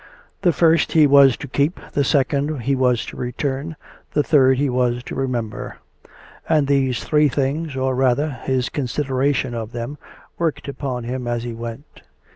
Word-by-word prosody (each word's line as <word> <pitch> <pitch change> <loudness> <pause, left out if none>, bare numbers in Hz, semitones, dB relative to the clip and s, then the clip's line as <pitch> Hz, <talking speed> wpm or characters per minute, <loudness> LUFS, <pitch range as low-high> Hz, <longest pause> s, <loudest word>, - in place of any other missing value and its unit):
The 175 - +4
first 165 -1 +3
he 155 -2 +6
was 140 -3 +6
to 145 - -7
keep, 140 +6 0
the 145 - +1
second 140 0 0
he 135 +4 0
was 125 -3 +1
to - - -9
return, 135 +5 -3 0.4
the 150 - +2
third 130 -4 +4
he 145 +2 +1
was 125 -1 0
to - - -7
remember; 120 -5 -3 0.7
and 155 -3 +3
these 135 -3 +1
three 150 -1 +3
things, 140 +3 -2
or, 130 0 0
rather, 130 +4 +1
his 130 -1 -2
consideration 135 -1 -1
of 115 -1 -5
them, 120 +5 -5 0.4
worked 165 -4 -1
upon 135 -3 -4
him 125 +1 -4
as 120 -1 -2
he 120 -1 -5
went. 115 +5 -9
135 Hz, 165 wpm, -21 LUFS, 125-145 Hz, 0.7 s, he